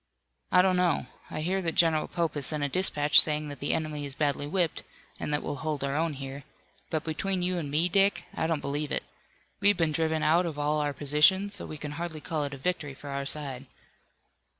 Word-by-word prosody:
"I 180 - +6
don't 185 -1 +2
know. 175 -7 +1 0.2
I 155 - -4
hear 185 +4 -1
that 165 -3 -2
General 160 -2 +3
Pope 170 -2 -2
has 145 -2 0
sent 150 -2 +2
a 145 - 0
dispatch 150 -3 +6
saying 150 -1 0
that 145 - -8
the 145 - -1
enemy 155 -2 -2
is 140 -1 -3
badly 145 -1 -1
whipped, 170 0 -1 0.4
and - - -3
that 145 - 0
we'll 145 - -4
hold 155 -2 -3
our 140 0 -2
own 160 0 0
here. 135 0 -7 0.5
But 155 -2 -2
between 180 +4 -2
you 180 0 -1
and 150 -4 -5
me, 155 +5 +2
Dick, 195 +2 +2
I 160 - -1
don't 160 -3 -1
believe 145 +1 -3
it. - - -1 0.6
We've 205 -1 +4
been 165 -2 +1
driven 160 0 0
out 170 +3 +3
of 155 -3 -6
all 150 +1 0
our 145 -1 -1
positions, 150 +9 +3
so 200 - -5
we 155 - -7
can 150 0 -6
hardly 170 -3 -5
call 155 0 -3
it 140 - -5
a - - -10
victory 150 -2 -3
for 140 +1 -9
our 140 0 -3
side." 140 -3 -2
155 Hz, 225 wpm, -28 LUFS, 145-170 Hz, 0.6 s, I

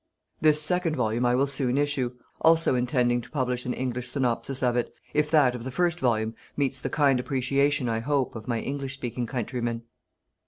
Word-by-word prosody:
This 155 -1 +4
second 170 +1 +2
volume 120 -1 +1
I 120 - +3
will 135 +2 +3
soon 135 -2 0
issue, 140 -4 0 0.3
also 165 -3 +4
intending 125 -1 +1
to 120 - -13
publish 125 -3 -2
an 125 - 0
English 125 -1 -2
synopsis 130 +1 -1
of 120 -1 +2
it, 120 - -1 0.2
if 150 0 +1
that 145 -5 +4
of 125 -2 -6
the 130 - -4
first 175 +5 0
volume 110 -3 +1 0.2
meets 135 -2 0
the - - -3
kind 140 -4 +3
appreciation 135 +1 +1
I 115 -1 0
hope 135 +1 -1
of 110 -2 -8
my 115 -2 -1
English 135 -1 -4
speaking 120 -2 -4
countrymen. 120 -1 -3
130 Hz, 190 wpm, -26 LUFS, 120-145 Hz, 0.3 s, This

